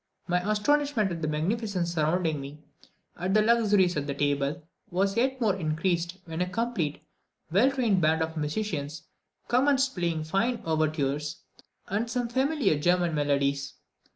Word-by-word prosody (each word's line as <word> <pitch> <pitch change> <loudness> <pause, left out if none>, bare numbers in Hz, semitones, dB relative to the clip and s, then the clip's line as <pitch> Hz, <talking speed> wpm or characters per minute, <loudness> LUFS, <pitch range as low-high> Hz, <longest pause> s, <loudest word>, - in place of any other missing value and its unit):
My 180 +1 +2
astonishment 250 -1 +2
at 165 -1 -4
the 155 - -1
magnificence 175 +3 -1
surrounding 160 -1 0
me, 140 +2 -8 0.6
at 185 +3 -1
the 215 - +6
luxuries 210 -5 +3
at 145 -1 -2
table, 145 +3 0 0.3
was 195 +2 0
yet 260 +2 +1
more 215 -5 +2
increased 170 +1 -1
when 165 0 -4
a 180 - 0
complete, 220 -9 -2 0.5
well 210 +10 +5
trained 235 -9 +1
band 160 +1 +3
of 160 0 -5
musicians 155 -2 -3 0.4
commenced 270 +2 +3
playing 170 -3 -1
fine 215 +10 0
overtures 155 -2 -1 0.4
and 215 +4 -1
some 245 0 -1
familiar 265 - +1
German 175 +1 +2
melodies. 140 -1 0
175 Hz, 140 wpm, -27 LUFS, 155-225 Hz, 0.6 s, the